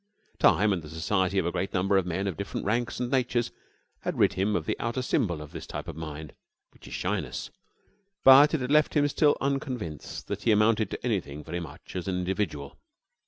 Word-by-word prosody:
Time 105 +1 +4
and 90 - -2
the 75 - -11
society 95 +4 0
of 95 - +2
a 85 - 0
great 95 +3 -3
number 95 +2 +2
of 95 -2 +2
men 95 +3 -2
of 95 -4 -2
different 100 - -5
ranks 115 +4 -1
and 125 0 -2
natures 125 -3 +1 0.5
had - - -3
rid - - +4
him 100 +3 0
of - - -1
the - - -1
outer 120 +2 -2
symbol 85 -10 0
of 75 - -12
this - - -8
type - - -6
of - - -6
mind, 75 -2 -7 0.4
which - - -16
is - - -9
shyness, - - -3 0.7
but 140 +4 +8
it 150 - -2
had 125 +2 -2
left 150 +1 +4
him 145 -1 +4
still 145 +1 +3
unconvinced 130 - -3
that 100 0 -4
he 115 - +2
amounted 110 0 +3
to - - -6
anything 85 - -2
very 85 +3 -4
much 85 - -10
as 90 0 -4
an 95 -1 -1
individual. 90 -7 -3
100 Hz, 210 wpm, -27 LUFS, 85-120 Hz, 0.7 s, but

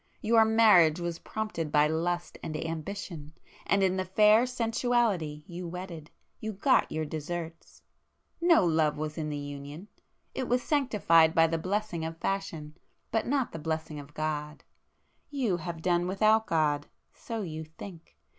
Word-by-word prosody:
Your 225 0 +5
marriage 210 -8 +5
was 170 -1 -4
prompted 215 -8 -4
by 150 0 +5
Lust 175 +3 -2
and 155 - -4
Ambition, 160 -1 -6 0.3
and 200 0 +3
in 190 0 +2
the 185 - 0
fair 210 +5 +4
Sensuality 230 -10 0
you 175 -1 -7
wedded, 170 -3 -7 0.3
you 220 0 -4
got 230 +7 +2
your 155 0 -2
deserts! 165 +2 -6 0.6
No 335 - +5
love 160 -3 +2
was 155 0 -4
in 155 -2 -3
the 150 - -3
union,—it 145 - -8
was 245 0 +1
sanctified 200 - +3
by 165 - +6
the 165 0 -1
blessing 185 -1 -2
of 165 0 -5
Fashion, 165 -5 -3 0.4
but 225 - 0
not 270 -1 0
the 165 - -6
blessing 160 -1 -3
of 145 +1 -12
God. 150 -1 -3 0.7
You 250 -11 0
have 165 -1 -6
done 175 -1 +2
without 215 +3 +3
God; 150 -3 +1 0.3
so 225 -2 -5
you 160 -3 -5
think! 165 +2 -12
170 Hz, 150 wpm, -29 LUFS, 155-215 Hz, 0.7 s, by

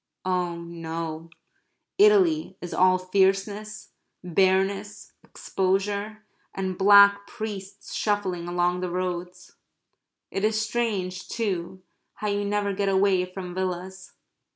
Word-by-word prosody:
Oh 180 -2 0
no, 165 -1 -6 0.7
Italy 365 - +4
is 175 - -7
all 185 0 +4
fierceness, 195 +3 0 0.3
bareness, 195 +3 0
exposure, 200 +3 -2 0.3
and 190 -1 -2
black 200 +1 +6
priests 200 -2 -7
shuffling 190 -5 -1
along 175 0 0
the 180 0 -3
roads. 180 0 -5 0.7
It 195 - -3
is 215 0 +2
strange, 215 -5 -2
too, 190 -4 -3 0.3
how 210 - -3
you 205 0 0
never 205 0 0
get 200 0 0
away 190 -1 +3
from 185 -1 -8
villas. 185 0 -5
190 Hz, 105 wpm, -25 LUFS, 180-205 Hz, 0.7 s, black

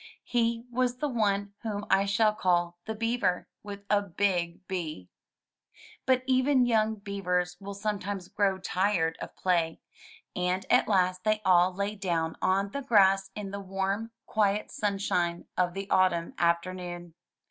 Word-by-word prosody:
He 235 -1 0
was 250 0 0
the 295 - -1
one 205 -5 0
whom 210 -2 -4
I 195 +1 +4
shall 210 +2 +3
call 175 -3 0
the 220 - -4
Beaver 230 -5 0
— - - -61
with 200 -1 -8
a 205 0 +3
big 185 -2 -1
B. 155 - -5 1.0
But 255 -1 +3
even 260 0 +3
young 220 -2 +2
beavers 180 -3 -2
will 200 0 -7
sometimes 200 -2 -3
grow 195 -2 +1
tired 185 -3 0
of - - -7
play, 170 -3 0 0.6
and 180 +1 -1
at - - +5
last 185 -2 +2
they 215 0 +2
all 180 0 +5
lay 200 +3 -2
down 170 -5 -1
on 195 +1 +1
the 280 - -3
grass 195 -6 +4
in 205 -2 -5
the 200 - -4
warm, 195 +3 -2 0.2
quiet 210 -1 0
sunshine 195 -4 -1
of 180 -1 0
the 195 0 -4
autumn 175 -3 +2
afternoon. 175 0 -1
195 Hz, 150 wpm, -28 LUFS, 180-215 Hz, 1.0 s, at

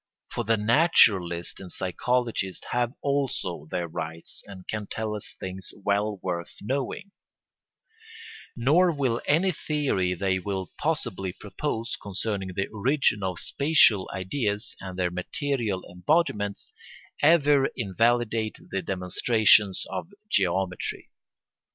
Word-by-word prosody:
For - - -2
the 115 +1 +2
naturalist 105 - +3
and 95 -2 -9
psychologist 110 0 -1
have 120 0 0
also 130 - -1
their 85 -1 -2
rights 80 +1 -5
and 95 -2 -11
can 105 -1 -4
tell 110 -1 -3
us 105 - -7
things 95 0 -6
well 100 +1 0
worth 85 -2 -3
knowing; 140 - -3 1.4
nor 155 +9 +4
will 130 -6 0
any 170 +6 +3
theory 135 - 0
they 95 0 0
may 95 0 -3
possibly 95 -1 -1
propose 115 +3 -4
concerning 100 -1 -3
the 95 - 0
origin 115 0 +1
of 95 -2 -2
spatial 140 - +4
ideas 105 +2 -2
and 95 -1 -7
their 90 -1 0
material 105 +2 -2
embodiments 105 - 0 0.5
ever 145 -3 +5
invalidate 115 +1 +1
the 95 - -1
demonstrations 100 +2 +3
of 180 - -5 0.2
geometry. 95 -1 0
105 Hz, 115 wpm, -26 LUFS, 95-130 Hz, 1.4 s, ever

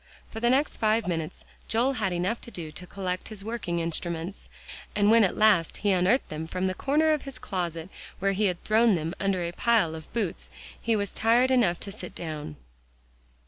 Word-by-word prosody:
For 225 - -6
the 240 +1 +2
next 275 +4 +2
five 220 0 +2
minutes 165 -3 -3 0.2
Joel 245 +5 +2
had 215 -7 -1
enough 180 +6 -1
to - - -9
do 165 -8 -7
to 180 +3 -8
collect 185 -1 -4
his 210 -3 -6
working 215 -6 -2
instruments, 170 +2 -3 0.5
and 205 0 +4
when 230 0 +7
at 190 - +1
last 210 -7 +4
he 205 - +5
unearthed 190 +8 +2
them 155 +1 -5
from 185 +2 -2
the 185 - +1
corner 305 +8 +2
of 300 - -1
his 275 -2 -7
closet 175 -6 -3 0.3
where 195 0 +1
he 205 +2 +1
had 180 -3 -1
thrown 220 0 +4
them 165 0 -2
under 195 -2 0
a 170 - -2
pile 215 -4 +2
of 160 -1 -9
boots, 210 -7 -3 0.3
he 230 -1 +1
was 200 -2 -2
tired 240 +4 +3
enough 215 -10 +3
to 200 - -6
sit 190 -3 -9
down. 155 - -5
195 Hz, 200 wpm, -27 LUFS, 175-225 Hz, 0.5 s, when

